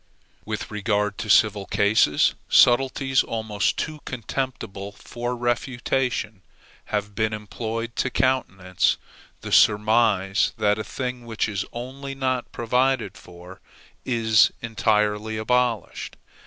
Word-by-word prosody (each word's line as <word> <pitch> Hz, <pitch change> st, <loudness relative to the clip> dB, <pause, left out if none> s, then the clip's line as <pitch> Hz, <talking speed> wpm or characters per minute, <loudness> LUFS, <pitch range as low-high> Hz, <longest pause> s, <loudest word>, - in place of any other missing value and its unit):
With -, -, -5 dB
regard 105 Hz, -1 st, -1 dB
to 105 Hz, 0 st, -5 dB
civil 105 Hz, -1 st, +4 dB
causes, 100 Hz, -7 st, +3 dB, 0.2 s
subtleties 135 Hz, +2 st, +4 dB
almost 110 Hz, -3 st, -1 dB
too 155 Hz, -1 st, -3 dB
contemptible 115 Hz, -5 st, -5 dB
for 120 Hz, +3 st, -5 dB
refutation 120 Hz, -3 st, -1 dB, 0.4 s
have 105 Hz, -1 st, -3 dB
been 110 Hz, +2 st, 0 dB
employed 115 Hz, +2 st, -5 dB
to 130 Hz, -, +1 dB
countenance 95 Hz, -10 st, +1 dB, 0.4 s
the -, -, -7 dB
surmise 105 Hz, -2 st, +3 dB
that 105 Hz, -1 st, +2 dB
a -, -, -2 dB
thing 125 Hz, +2 st, -5 dB
which 115 Hz, -1 st, -1 dB
is 100 Hz, -2 st, -3 dB
only 135 Hz, +3 st, -7 dB
not 130 Hz, -2 st, -2 dB
provided 125 Hz, -2 st, 0 dB
for, 90 Hz, +1 st, -13 dB, 0.4 s
is 110 Hz, -4 st, +3 dB
entirely 110 Hz, -1 st, 0 dB
abolished. 120 Hz, -2 st, -1 dB
110 Hz, 110 wpm, -24 LUFS, 105-125 Hz, 0.4 s, civil